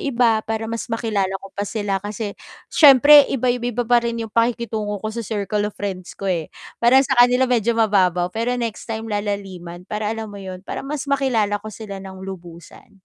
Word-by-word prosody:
iba, 235 Hz, -5 st, +2 dB
para 225 Hz, 0 st, -3 dB
mas 230 Hz, +1 st, -5 dB
makilala 220 Hz, -4 st, -1 dB
ko 195 Hz, -, -11 dB
pa 200 Hz, -, -2 dB
sila 200 Hz, -3 st, -2 dB
kasi 205 Hz, 0 st, -5 dB, 0.4 s
siyempre 290 Hz, 0 st, +8 dB
iba 255 Hz, -2 st, -1 dB
iba 245 Hz, 0 st, -2 dB
iba 245 Hz, +1 st, -2 dB
pa 240 Hz, 0 st, +4 dB
rin 235 Hz, 0 st, -2 dB
'yong 225 Hz, -2 st, -5 dB
pakikitungo 230 Hz, -3 st, 0 dB
ko 215 Hz, -, -4 dB
sa 235 Hz, -, -3 dB
circle 210 Hz, -1 st, -2 dB
of -, -, -29 dB
friends 190 Hz, -3 st, -6 dB
ko, 195 Hz, -, -5 dB
eh. 170 Hz, -4 st, -1 dB, 0.3 s
Parang 260 Hz, +3 st, +5 dB
sa 265 Hz, -, +1 dB
kanila 250 Hz, +1 st, +5 dB
medyo 235 Hz, -2 st, +1 dB
mababaw, 185 Hz, -5 st, +3 dB
pero 240 Hz, +3 st, -1 dB
next 230 Hz, -1 st, -4 dB
time 220 Hz, 0 st, -4 dB
lalaliman 195 Hz, -4 st, -5 dB
para 210 Hz, 0 st, -3 dB
alam 225 Hz, 0 st, -4 dB
mo 200 Hz, -1 st, -9 dB
'yon, 185 Hz, 0 st, -9 dB
para -, -, -5 dB
mas 290 Hz, +1 st, -5 dB
makilala 240 Hz, -7 st, +1 dB
ko 215 Hz, -, -7 dB
sila 200 Hz, -3 st, -8 dB
ng 190 Hz, -1 st, -10 dB
lubusan. 175 Hz, -3 st, -11 dB
220 Hz, 200 wpm, -21 LUFS, 200-235 Hz, 0.4 s, siyempre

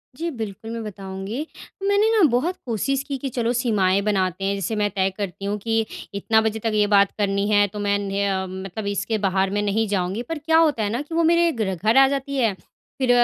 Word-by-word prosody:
जी, 335 Hz, +4 st, -3 dB
बिल्कुल 220 Hz, -2 st, -6 dB
मैं 230 Hz, -1 st, -4 dB
बताऊँगी। 195 Hz, +3 st, -6 dB, 0.4 s
मैंने 405 Hz, +2 st, +3 dB
ना -, -, +4 dB
बहुत 280 Hz, +10 st, 0 dB
कोशिश 265 Hz, +4 st, -1 dB
की 280 Hz, -1 st, -4 dB
कि 270 Hz, +1 st, -4 dB
चलो 235 Hz, +1 st, +1 dB
सीमाएँ 200 Hz, -6 st, +2 dB
बनाते 190 Hz, -1 st, 0 dB
हैं 200 Hz, +1 st, +1 dB
जैसे 200 Hz, +3 st, -2 dB
मैं 210 Hz, -1 st, +1 dB
तय 190 Hz, 0 st, +2 dB
करती 195 Hz, -1 st, -5 dB
हूँ 205 Hz, +1 st, -1 dB
कि 225 Hz, -1 st, +1 dB, 0.3 s
इतना 220 Hz, +2 st, +2 dB
बजे 220 Hz, 0 st, -1 dB
तक 225 Hz, -, +1 dB
ये 210 Hz, -1 st, +3 dB
बात 200 Hz, -1 st, +4 dB
करनी 200 Hz, -1 st, 0 dB
है 205 Hz, -1 st, +5 dB
तो 210 Hz, +2 st, -8 dB
मैंने 200 Hz, -1 st, 0 dB
अ, 190 Hz, -1 st, -1 dB
मतलब 190 Hz, +2 st, -6 dB
इसके 205 Hz, +2 st, -1 dB
बाहर 190 Hz, 0 st, +1 dB
मैं 205 Hz, -, +1 dB
नहीं 210 Hz, +2 st, 0 dB
जाऊँगी 195 Hz, +2 st, -1 dB
पर 330 Hz, -, -2 dB
क्या 320 Hz, +2 st, +2 dB
होता 300 Hz, -9 st, +3 dB
है 205 Hz, -, 0 dB
ना 235 Hz, +5 st, -2 dB
कि 310 Hz, +3 st, -7 dB
वो 335 Hz, -, +3 dB
मेरे 340 Hz, 0 st, +3 dB
ग्र 215 Hz, -8 st, -2 dB
घर 215 Hz, +7 st, +2 dB
आ 270 Hz, 0 st, +8 dB
जाती 275 Hz, 0 st, -2 dB
है 230 Hz, -5 st, +2 dB, 0.5 s
फिर 260 Hz, -2 st, 0 dB
210 Hz, 225 wpm, -23 LUFS, 195-250 Hz, 0.5 s, आ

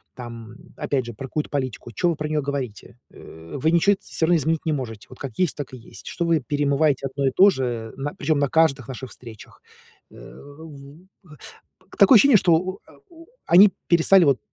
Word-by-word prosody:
Там, 115 Hz, -2 st, -10 dB, 0.2 s
опять 135 Hz, -3 st, -2 dB
же, 120 Hz, -, -8 dB
про 135 Hz, +5 st, -8 dB
какую-то 150 Hz, +3 st, -4 dB
политику, 130 Hz, -4 st, -4 dB
чё 175 Hz, -, 0 dB
вы 170 Hz, -, -1 dB
про 150 Hz, +1 st, -4 dB
неё 155 Hz, -1 st, 0 dB
говорите? 125 Hz, -5 st, -6 dB
Э, 80 Hz, +1 st, -14 dB
вы 155 Hz, +4 st, +1 dB
ничего 170 Hz, +4 st, +3 dB
это 195 Hz, -, -9 dB
всё 160 Hz, -, -2 dB
равно 175 Hz, -, +3 dB
изменить 160 Hz, +1 st, -2 dB
не 160 Hz, -, 0 dB
можете, 115 Hz, -7 st, -6 dB
вот 130 Hz, -, -14 dB
как 135 Hz, -5 st, -8 dB
есть, 180 Hz, -4 st, +1 dB
так 145 Hz, -3 st, -7 dB
и -, -, -8 dB
есть. 115 Hz, -, -14 dB
Что 170 Hz, -, -3 dB
вы 165 Hz, -2 st, +1 dB
перемываете 145 Hz, 0 st, 0 dB
одно 140 Hz, +1 st, -3 dB
и -, -, +1 dB
то 195 Hz, +2 st, +6 dB
же, 135 Hz, -9 st, -2 dB
э, 115 Hz, -2 st, -5 dB
на 145 Hz, +2 st, -4 dB
причём 150 Hz, 0 st, -1 dB
на 140 Hz, -1 st, 0 dB
каждых 145 Hz, -6 st, +1 dB
наших 130 Hz, 0 st, -7 dB
встречах. 115 Hz, -4 st, -14 dB, 0.5 s
Э, -, -, -17 dB
в 150 Hz, +3 st, -15 dB
такое 265 Hz, -, +6 dB
ощущение, 275 Hz, 0 st, +6 dB
что 175 Hz, -3 st, +2 dB
у 185 Hz, +3 st, -3 dB
а -, -, -18 dB, 0.2 s
у 330 Hz, -1 st, -16 dB, 0.2 s
они 190 Hz, +4 st, +7 dB, 0.2 s
перестали 175 Hz, +2 st, +4 dB
вот, 140 Hz, -3 st, +2 dB
145 Hz, 210 wpm, -22 LUFS, 130-165 Hz, 0.5 s, они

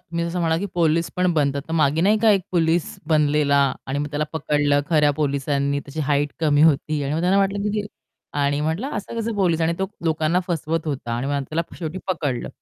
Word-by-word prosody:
मी 170 Hz, 0 st, -1 dB
तसं 175 Hz, +1 st, -3 dB
म्हणाला, 165 Hz, -1 st, +1 dB
की 200 Hz, -, -3 dB
पोलीस 165 Hz, -1 st, +1 dB
पण 180 Hz, -1 st, +2 dB
बनतात. 140 Hz, -3 st, 0 dB
तर -, -, -5 dB
मागे 155 Hz, -1 st, +2 dB
नाही 205 Hz, +5 st, +3 dB
का 220 Hz, 0 st, +4 dB
1 200 Hz, -2 st, +4 dB
पोलीस 165 Hz, -1 st, +1 dB
बनलेला 150 Hz, -2 st, +3 dB, 0.3 s
आणि 135 Hz, +1 st, -2 dB
मग 145 Hz, -, -1 dB
त्याला 150 Hz, 0 st, -1 dB
पकडलं 145 Hz, -2 st, +1 dB
खऱ्या 150 Hz, -2 st, +4 dB
पोलिसांनी. 140 Hz, -1 st, 0 dB
त्याची 140 Hz, +2 st, -7 dB
हाइट 145 Hz, 0 st, 0 dB
कमी 150 Hz, -2 st, +3 dB
होती 155 Hz, -1 st, +2 dB
आणि 140 Hz, +1 st, -2 dB
मग 160 Hz, -, 0 dB
त्यांना 185 Hz, +3 st, +3 dB
वाटलं, 195 Hz, 0 st, +1 dB
की 210 Hz, -, 0 dB
ती 205 Hz, -, -6 dB, 0.5 s
आणि 145 Hz, 0 st, +1 dB
म्हटलं, 160 Hz, -, -1 dB
असं 210 Hz, +3 st, -5 dB
कसं 225 Hz, 0 st, -2 dB
पोलीस? 175 Hz, -5 st, +1 dB
आणि 165 Hz, +1 st, +2 dB
तो 190 Hz, -, 0 dB, 0.2 s
लोकांना 160 Hz, +2 st, +1 dB
फसवत 165 Hz, -1 st, -2 dB
होता 135 Hz, -5 st, -3 dB
आणि 125 Hz, +3 st, -3 dB
मग 140 Hz, 0 st, -1 dB
त्याला 160 Hz, +2 st, 0 dB, 0.2 s
शेवटी 165 Hz, +1 st, -4 dB
पकडलं. 150 Hz, -9 st, -2 dB
155 Hz, 215 wpm, -22 LUFS, 145-170 Hz, 0.5 s, का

